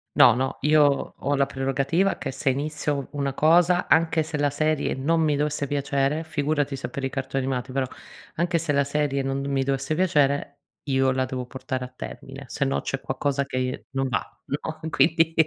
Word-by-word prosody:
No, 120 - +8
no, 130 +2 -2
io 150 -2 +3
ho 145 +1 0
la 140 - +4
prerogativa 140 +8 0
che - - -4
se 135 +1 -1
inizio 145 +1 -1
u 140 - -5
una 140 -2 -2
cosa, 175 +4 +4
anche 160 -1 +3
se 155 -1 -4
la 145 0 +2
serie 155 +1 0
non 160 +5 +1
mi 150 -2 +2
dovesse 150 -1 -1
piacere, 140 +2 0
figurati 145 -2 -1
se 135 - -5
per 140 -4 -4
i - - -1
cartoni 135 0 -2
animati 130 -1 -2
però, 135 0 0 0.5
anche 170 +1 +1
se 160 -2 -1
la 140 - +3
serie 140 -1 0
non 135 0 -1
mi 140 -1 0
dovesse 135 +3 -1
piacere, 145 -5 +1 0.3
io 135 -1 +3
la 130 0 +1
devo 130 -1 -4
portare 130 0 -4
a - - -7
termine, 135 +2 -8
sennò 140 +2 -1
c'è 135 - -3
qualcosa 140 +1 -1
che 135 - -5
i 130 0 -2
non 135 0 -1
va, 120 +1 -3
no, 155 +2 -4
quindi 165 +2 +3
140 Hz, 195 wpm, -25 LUFS, 135-155 Hz, 0.5 s, No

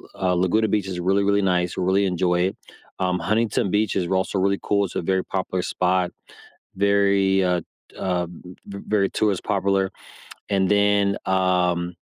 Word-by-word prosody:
uh, 90 -1 0
Laguna 95 +5 +2
Beach 105 -2 0
is 90 -2 -4
really, 95 +3 +1
really 100 0 +2
nice, 90 -2 0
really 95 +2 +2
enjoy 90 -1 +1
it, - - -13 0.4
um, 90 -1 0
Huntington 105 +1 0
Beach 105 0 +1
is 90 -3 0
also 95 +1 0
really 100 +1 +1
cool, 100 -1 +1
it's 90 - -9
a - - -1
very 95 +2 0
popular 95 -1 -3
spot, 90 0 0 0.6
very, 100 -1 +2
uh 90 -2 +1 0.4
uh, 90 -2 -1 0.4
v 100 0 -8
very 100 -2 +1
tourist 105 -4 0
popular, 100 -1 +1 0.6
and 95 -2 +1
then, 100 -1 +2
um, 90 -2 +1
95 Hz, 160 wpm, -23 LUFS, 90-100 Hz, 0.6 s, Laguna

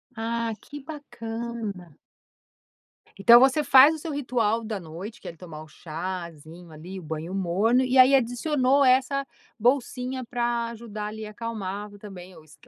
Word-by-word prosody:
Ah, 230 0 -2
que 290 0 -10
bacana. 230 - -7 1.2
Então 235 +4 +8
você 270 +4 +4
faz 280 +3 +7
o 315 - -8
seu 320 +1 -6
ritual 235 -5 0
da 215 -2 -4
noite, 175 +7 -9
que - - -10
é 170 - -7
tomar 155 -3 -10
o - - -15
chazinho 170 0 -8
ali, 175 +5 -9
o - - -12
banho 160 +3 -5
morno 195 +7 +2
e 255 +1 +1
aí 260 +2 +7
adicionou 265 +2 +2
essa 270 +2 +2 0.3
bolsinha 255 +1 0
pra 235 0 -1
ajudar 215 -2 -7
ali 215 +1 -7
acalmar 210 -2 -6
e - - -12
também 185 -3 -11
o 160 - -15
esque 155 -1 -20
225 Hz, 155 wpm, -25 LUFS, 185-255 Hz, 1.2 s, Então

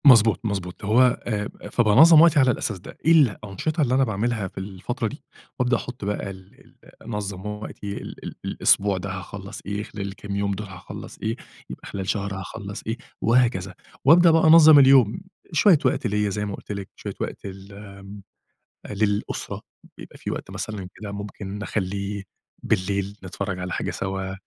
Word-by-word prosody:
مضبوط، 115 -5 +7
مضبوط، 95 -3 -4
هو 110 +5 +4 0.3
آآ 105 -3 -2 0.2
فبانظّم 135 +9 +7
وقتي 165 -3 +6
على 130 -2 +5
الأساس 110 -3 -3
ده، - - -12
إيه 165 - +5
الأنشطة 145 - +2
اللي 130 -4 +2
أنا 135 - +4
باعملها 110 -2 -1
في - - -17
الفترة 100 +6 -4
دي، 145 +7 -9 0.4
وأبدأ 125 -1 +2
أحُطّ 120 -4 -7
بقى 105 -1 -2
ال 95 0 -13
ال - - -22 0.3
أنظّم 105 -3 -5
وقتي، 105 -1 -6
ال - - -9
ال - - -6
الأسبوع 100 -1 +2
ده 95 +2 -5
هاخلّص 95 +1 -7
إيه، 100 +1 -3
خلال 105 -3 -6
الكام 100 +1 -6
يوم 100 0 0
دول 105 +1 -6
هاخلّص 95 -2 -10
إيه، 110 +1 -1 0.3
يبقى - - -9
خلال 95 -1 -5
شهر 100 -1 -1
هاخلّص 100 +1 -7
إيه، 115 +2 -2 0.2
وهكذا 115 -6 +2 0.3
وأبدأ 170 +4 +7
بقى 165 0 +4
أنظّم 155 -2 +9
اليوم، 135 - +5 0.3
شوية 165 +2 +5
وقت 125 - +1
ليا 105 0 0
زي 105 +1 -2
ما 100 -1 -4
قُلت - - -10
لِك، 100 -2 -5
شوية - - -6
وقت - - -5
لل 95 0 -9
آمم 100 0 -11 0.7
للأُسرة، 105 0 -2 0.4
بيبقى - - -12
في - - -5
وقت - - -6
مثلًا 105 -4 -5
كده 105 -2 -7
ممكن 100 0 -6
نخلّيه 100 0 -3 0.4
بالليل، 100 0 -1
نتفرّج 95 0 -4
على 90 0 -4
حاجة - - -2
سوا، 95 0 -4
105 Hz, 170 wpm, -24 LUFS, 100-120 Hz, 0.7 s, أنظّم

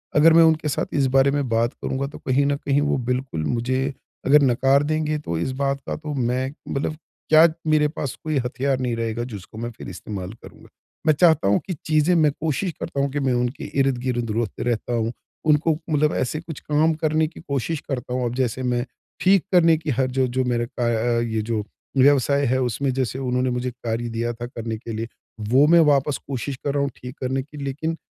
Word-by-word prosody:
अगर 160 +2 +7
मैं 165 0 +8
उनके 155 -1 -2
साथ - - 0 0.2
इस 135 - +3
बारे 135 +1 +5
में 145 -2 0
बात 115 +1 +1
करूँगा, 135 +1 -3
तो 145 - -10
कहीं 135 +2 +3
न 140 0 +2
कहीं 145 +1 +2
वो - - +2
बिल्कुल 125 - -2
मुझे 130 +2 0 0.5
अगर 145 +3 +6
नकार 135 +2 +3
देंगे, 155 0 0
तो 85 - -3
इस 130 - -1
बात 140 0 0
का - - -2
तो 155 -1 -6 0.2
मैं 130 +2 -1 0.2
मतलब 145 +2 -2 0.3
क्या 155 +1 +8 0.3
मेरे 150 -1 +4
पास 135 - -3
कोई 155 -2 -1
हथियार 135 +1 -1
नहीं 125 -2 -1
रहेगा, 115 +1 -2
जिसको 100 +2 -11
मैं 120 - -4
फिर - - -8
इस्तेमाल 95 +2 -6
करूँगा। - - -14 0.4
मैं 155 - +6
चाहता 160 - +4
हूँ 100 - +4
कि 185 - -2
चीज़ें 155 +3 +3
मैं 150 -2 +4
कोशिश 160 +4 -1
करता 140 - -4
हूँ 140 - +1
कि 145 - -2
मैं 130 - +2
उनके 125 +3 -3 0.2
इर्द-गिर्द 125 -3 0
रोत 115 -4 -2
रहता 120 +1 -1
हूँ। 115 +1 -1 0.4
उनको 150 +2 +4 0.2
मतलब 150 0 +2
ऐसे 140 +4 -1
कुछ 160 -3 -8
काम 155 +2 +2
करने 155 0 +2
की 165 - -12
कोशिश 140 +1 -2
करता 125 -2 -3
हूँ। 125 0 0
अब 120 - -2
जैसे, 130 0 -1
मैं 125 -1 0 0.4
ठीक 190 -1 +4
करने 165 -2 +6
की 155 -1 -6
हर 130 - +3
जो 130 - +4
जो 130 - +3
मेरा 120 0 0 0.2
अ 120 +1 +1
अ, - - +1
ये 110 -2 -1
जो 110 -2 0 0.3
व्यवसाय 140 +1 +4
है, 130 +1 +1
उसमें 130 +3 0
जैसे 130 0 -2
उन्होंने 125 +1 +1
मुझे 125 +1 -2
कार्य 120 -1 -3
दिया 120 +1 -1
था 120 +1 -6
करने 115 -3 -5
के 115 - -8
लिए, 115 +1 -3 0.3
वो 125 +7 +4
मैं 170 - +8
वापस 140 0 +1
कोशिश 135 0 -3
कर 140 - 0
रहा 145 - +1
हूँ 140 - 0
ठीक 125 +2 -9
करने 130 +1 -1
की, 150 +1 -14
लेकिन 155 +4 -3
135 Hz, 215 wpm, -23 LUFS, 120-150 Hz, 0.5 s, मैं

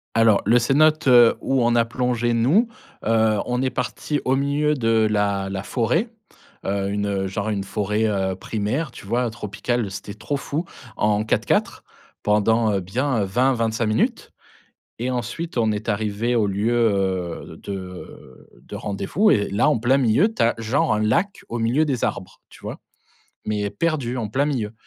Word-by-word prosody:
Alors, 115 -2 +4
le 115 +4 +5
cénote, 150 +5 +3
heu, 120 -2 +7
où 135 -2 +1
on 120 - +3
a 115 -1 +4
plongé 120 0 -1
nous. 140 - +3 0.4
Heu, 110 -1 +3
on 125 0 0
est 130 - 0
partis 145 +3 -3
au 130 - +2
milieu 145 +2 +1
de 115 -4 +2
la 100 -2 0
la 95 0 -4
forêt, 135 - 0 0.6
heu, 100 0 -1
une, 105 0 -1
heu, 95 -1 -1
genre 100 +3 -3
une 100 -2 -1
forêt, 105 +2 -1
heu, 95 -2 -1
primaire, 110 - -3
tu 100 - -12
vois? 120 +3 +1
Tropicale, 115 +1 -3
c'était 100 +1 -7
trop 140 +7 -3
fou 150 +5 -3 0.3
en 105 0 +2
4x4, 110 - 0 0.4
pendant, 110 +2 +2
heu, 100 - +1
bien 115 +5 -1
20-25 115 +1 +1
minutes 110 +1 0 0.7
et 125 +3 -2
ensuite 125 +7 -4
on 110 -2 +2
est 105 +1 -5
arrivés 110 +3 -1
au 110 -3 +2
lieu, 100 +4 0
heu, 95 -7 0
de 90 -9 -9
de - - -8
rendez-vous 105 - 0
et 100 - +2
là, 100 +10 +2
en 150 - +2
plein 125 +4 +3
milieu, 135 - +3
tu - - -9
as 115 +1 +3
genre 115 0 +1
un 105 - 0
lac 170 - 0
au 120 - -2
milieu 120 +7 +2
des 135 -6 -2
arbres, 95 0 -4
tu - - -16
vois? - - -7 0.6
Mais 105 -1 -1
perdu 130 +1 -1
en 115 -3 -2
plein 135 +7 0
milieu 120 -8 -2
115 Hz, 175 wpm, -22 LUFS, 105-125 Hz, 0.7 s, heu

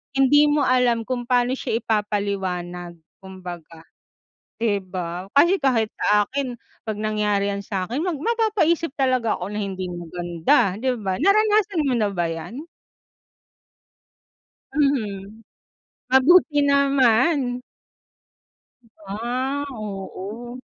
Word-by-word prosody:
hindi 290 +2 +5
mo 295 0 +2
alam 245 -2 +2
kung 245 0 -4
pa'no 245 0 +2
siya 235 -3 -2
ipapaliwanag 190 -5 -2 0.2
kumbaga, 175 -4 -10 0.8
'di 210 -3 +2
ba? 180 0 -5
Kasi 345 +7 +5
kahit 240 -6 +1
sa 210 0 +3
akin, 260 +2 -3 0.3
'pag 220 - -2
nangyari 210 -2 0
'yan 200 0 -5
sa'kin, 200 +6 -3
mag 350 +2 -1
mapapaisip 340 - 0
talaga 255 -5 +1
ako 180 +3 -5
ng 210 - -4 0.2
hindi 185 -1 -5
maganda, 175 +2 0
'di 255 +2 0
ba? 190 -2 -2
Naranasan 415 -3 +3
mo 270 -3 0
na 210 -2 +1
ba 175 -2 0
'yan? 195 - -6 2.1
Mhm, 220 -7 -1 0.7
mabuti 290 +4 +5
naman. 275 -1 +3 1.5
Ah, 250 +7 -2
oo. 215 +2 -7
230 Hz, 105 wpm, -23 LUFS, 195-275 Hz, 2.1 s, hindi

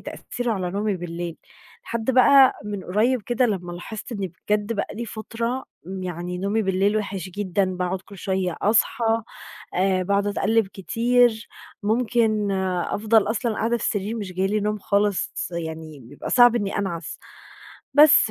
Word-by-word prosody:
تأثير 245 -1 -4
على 185 -5 -1
نومي 205 +1 -1
بالليل 170 -1 -5 0.5
لحد 230 +1 -2
بَقى 260 +1 +7
من 205 -3 -5
قُريب 220 +6 +1
كده 240 +3 +1
لمّا 180 -5 -3
لاحظت 210 +7 -7
إني 195 -6 -4 0.2
بجد 210 +1 +1
بقى 205 -3 -2
لى 235 - -4
فترة، 230 +3 -4 0.4
يعني 180 0 -4
نومي 200 +4 0
بالليل 195 +2 +1
وحش 195 -3 -3
جدًا 195 0 0
باقعد 180 +1 -2
كل 200 - -13
شوية 190 -2 -1
أصحى 225 +1 +2 0.5
آآ 185 0 +2
باقعد 200 +2 +1
أتقلِّب 215 +2 +2
كتير 230 +3 +1 0.3
ممكن 220 -1 +1 0.4
أفضل 215 0 +2
أصلًا 230 0 -1
قاعدة 230 +2 0
في - - -4
السرير 210 +2 -1
مش 200 -4 -5
جاي 185 +1 0
لي 210 +2 0
نوم 210 +1 -1
خالص، 200 0 0
يعني 160 -3 -6
بيبقى 120 -1 -8
صعب 245 -1 +6
إني 205 -4 -1
أنعس. 170 -5 -4 0.8
بس، 300 0 +7
205 Hz, 150 wpm, -23 LUFS, 185-225 Hz, 0.8 s, بَقى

